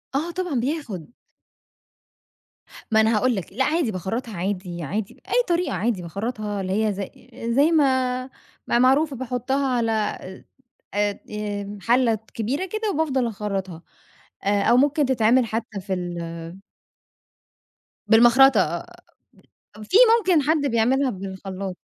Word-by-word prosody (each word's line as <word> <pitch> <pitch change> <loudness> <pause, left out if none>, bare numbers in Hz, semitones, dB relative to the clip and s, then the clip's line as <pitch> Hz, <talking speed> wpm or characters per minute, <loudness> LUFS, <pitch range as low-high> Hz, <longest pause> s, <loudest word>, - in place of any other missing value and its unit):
آه 330 +5 -1
طبعًا، 355 -8 -2
بياخد. 245 - -4 1.8
ما 220 0 +5
أنا 220 0 +3
هاقول 250 +1 +2
لك، 190 -1 -6
لأ، 265 - +1
عادي 310 -6 +1
باخرّطها 210 +3 -4
عادي 180 -2 -3
عادي، 200 +7 -3
بأي - - 0
طريقة 345 -4 0
عادي، 195 +1 -1
باخرّطها 205 +3 -4
اللي 185 0 -2
هي 210 - +1
ز 200 - -5 0.5
زي 295 +4 +4
ما 260 -4 +2 0.4
ما - - +1
هي - - +4
معروفة، 270 +3 +3
باحطها 260 +2 -1
على 235 -3 +1 1.0
آآ، 205 0 0
آآ، 205 -1 -4
حلة 235 0 +3 0.2
كبيرة 265 - -2
كده 430 +2 -2
وبافضل 270 -6 0
أخرّطها. 195 -5 -4 0.6
آآ، 200 0 +2
أو 240 - +4
ممكن 285 +2 +3
تتعمل 245 -1 +3
حتى 220 -2 -4
في 190 0 -4
ال 170 0 -5 1.5
بالمخرطة 240 +4 +6
آآ، - - -1 1.0
في 215 - 0 0.2
ممكن 360 -8 +2
حد 305 0 +1
بيعملها 255 +4 +2
بالخلاط. 190 -1 -6
230 Hz, 130 wpm, -23 LUFS, 200-270 Hz, 1.8 s, بالمخرطة